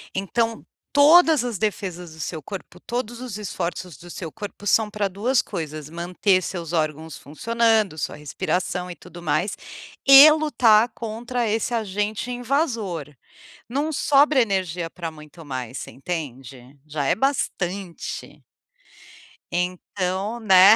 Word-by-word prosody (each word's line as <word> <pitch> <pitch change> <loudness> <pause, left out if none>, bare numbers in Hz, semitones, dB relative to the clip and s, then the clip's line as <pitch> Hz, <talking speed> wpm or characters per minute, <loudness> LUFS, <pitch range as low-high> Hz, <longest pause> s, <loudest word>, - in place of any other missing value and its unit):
Então, 225 +4 -1 0.3
todas 310 -1 +7
as 235 -5 -3
defesas 180 -5 -3
do 160 - -14
seu 160 0 -4
corpo, 180 +1 -9
todos 240 +1 -4
os 245 -5 -6
esforços 180 -3 -4
do 175 - -13
seu 170 -2 -6
corpo 205 -1 -8
são 210 +2 +3
pra 205 -1 -1
2 230 +7 +1
coisas: 155 -5 -6
manter 180 +3 +1
seus 170 -2 -5
órgãos 155 -2 -2
funcionando, 220 +4 +1
sua - - -3
respiração 180 +5 -2
e 175 - -7
tudo 175 - -12
mais, 175 +5 0 0.5
e 275 +3 +11
lutar 245 -8 +4
contra 235 +2 -3
esse 225 +3 -1
agente 210 +2 -2
invasor. 230 - -1 0.6
Não 290 +6 -1
sobra 280 -1 +4
energia 180 -5 -2
pra 165 -2 -6
muito 155 +1 -13
mais, 130 -2 -5
você - - -8
entende? 135 -4 -7
Já 150 -1 -3
é - - +3
bastante. 195 -9 -3 1.1
Então, 185 +4 -2
né, 195 0 +8
195 Hz, 130 wpm, -23 LUFS, 170-230 Hz, 1.1 s, e